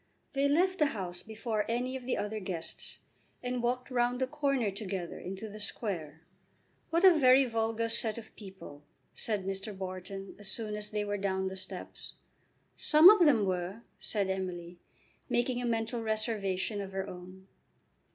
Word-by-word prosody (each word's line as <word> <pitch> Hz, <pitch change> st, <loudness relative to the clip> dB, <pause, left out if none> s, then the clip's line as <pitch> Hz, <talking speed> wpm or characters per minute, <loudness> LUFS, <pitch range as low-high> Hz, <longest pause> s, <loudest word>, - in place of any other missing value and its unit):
They 280 Hz, +1 st, +2 dB
left 370 Hz, +6 st, +3 dB
the 300 Hz, -, +5 dB
house 180 Hz, -2 st, -4 dB
before 220 Hz, -1 st, -2 dB
any 250 Hz, +3 st, -1 dB
of 255 Hz, -1 st, -6 dB
the 260 Hz, -, +1 dB
other 210 Hz, +1 st, -2 dB
guests 180 Hz, -4 st, -5 dB, 0.5 s
and 250 Hz, 0 st, -1 dB
walked 250 Hz, +2 st, -1 dB
round 245 Hz, 0 st, +1 dB
the 260 Hz, -, +2 dB
corner 275 Hz, -6 st, 0 dB
together 190 Hz, -3 st, -4 dB
into 195 Hz, +4 st, -6 dB
the 215 Hz, 0 st, -9 dB
Square. 170 Hz, -8 st, -2 dB, 0.7 s
"What 335 Hz, +2 st, +2 dB
a 375 Hz, -2 st, +10 dB
very 260 Hz, 0 st, +7 dB
vulgar 225 Hz, -1 st, 0 dB
set 225 Hz, -1 st, +1 dB
of 225 Hz, -2 st, -10 dB
people!" 190 Hz, -8 st, -11 dB, 0.3 s
said 210 Hz, -4 st, -1 dB
Mr. 195 Hz, +1 st, -4 dB
Wharton 190 Hz, +1 st, -6 dB
as 205 Hz, -, -5 dB
soon 215 Hz, +1 st, -3 dB
as 210 Hz, 0 st, -3 dB
they 210 Hz, -1 st, -1 dB
were 205 Hz, 0 st, -1 dB
down 190 Hz, -1 st, 0 dB
the 190 Hz, -, -7 dB
steps. 185 Hz, 0 st, -5 dB, 0.6 s
"Some 310 Hz, +5 st, +8 dB
of 380 Hz, -6 st, +6 dB
them 230 Hz, -8 st, +4 dB
were," 185 Hz, +4 st, -2 dB, 0.2 s
said 205 Hz, -3 st, 0 dB
Emily, 180 Hz, -2 st, -4 dB, 0.5 s
making 245 Hz, +1 st, +1 dB
a 245 Hz, -, -1 dB
mental 230 Hz, +1 st, -1 dB
reservation 215 Hz, -2 st, -1 dB
of 195 Hz, -1 st, -7 dB
her 195 Hz, 0 st, -2 dB
own. 185 Hz, +1 st, -10 dB
215 Hz, 165 wpm, -31 LUFS, 190-245 Hz, 0.7 s, a